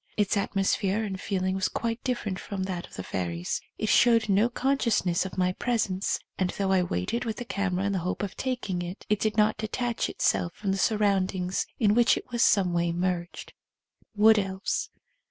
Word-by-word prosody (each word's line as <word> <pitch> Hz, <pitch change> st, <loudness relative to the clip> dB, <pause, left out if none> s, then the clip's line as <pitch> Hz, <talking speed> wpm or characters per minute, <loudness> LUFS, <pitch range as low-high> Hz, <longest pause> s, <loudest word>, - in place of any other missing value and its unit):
Its 210 Hz, -1 st, +2 dB
atmosphere 195 Hz, +1 st, 0 dB
and 195 Hz, -3 st, -4 dB
feeling 185 Hz, -2 st, -1 dB
was 190 Hz, -1 st, 0 dB
quite 230 Hz, 0 st, -3 dB
di:fferent 225 Hz, -7 st, -2 dB
from 195 Hz, -2 st, -4 dB
that 185 Hz, -2 st, -4 dB
of -, -, -14 dB
the 95 Hz, -, -5 dB
fairies. 85 Hz, -2 st, -3 dB, 0.2 s
It 215 Hz, -, -2 dB
showed 230 Hz, -2 st, +4 dB
no 205 Hz, +4 st, +4 dB
con 270 Hz, +3 st, 0 dB
sciousness 190 Hz, -7 st, +1 dB
of 190 Hz, -, -11 dB
my 180 Hz, 0 st, +2 dB
presence, 205 Hz, -4 st, 0 dB, 0.2 s
and, 185 Hz, -1 st, +1 dB
though 195 Hz, +1 st, -1 dB
I 190 Hz, -1 st, +4 dB
waited 175 Hz, -, -2 dB
with 225 Hz, -2 st, -3 dB
the 245 Hz, -, -6 dB
camera 195 Hz, -3 st, -1 dB
in 200 Hz, -, +1 dB
the 190 Hz, -, 0 dB
hope 180 Hz, +4 st, -3 dB
of 200 Hz, -, -4 dB
taking 245 Hz, -9 st, -2 dB
it, 175 Hz, +3 st, -7 dB
it 210 Hz, -1 st, +2 dB
did 215 Hz, 0 st, -1 dB
not 215 Hz, 0 st, +3 dB
detach 235 Hz, +2 st, -2 dB
itself 170 Hz, -1 st, 0 dB
from 200 Hz, -2 st, -2 dB
the 195 Hz, -, 0 dB
surround 200 Hz, -4 st, +2 dB
ings 180 Hz, 0 st, -1 dB
in 210 Hz, -4 st, +3 dB
which 235 Hz, +1 st, +4 dB
it -, -, -6 dB
was 240 Hz, -1 st, 0 dB
in -, -, +7 dB
some 185 Hz, -3 st, +2 dB
way 170 Hz, 0 st, +1 dB
merged. 175 Hz, 0 st, -3 dB, 0.6 s
Wood 215 Hz, +1 st, +6 dB
Elves. 190 Hz, -1 st, -2 dB
195 Hz, 205 wpm, -27 LUFS, 185-220 Hz, 0.6 s, in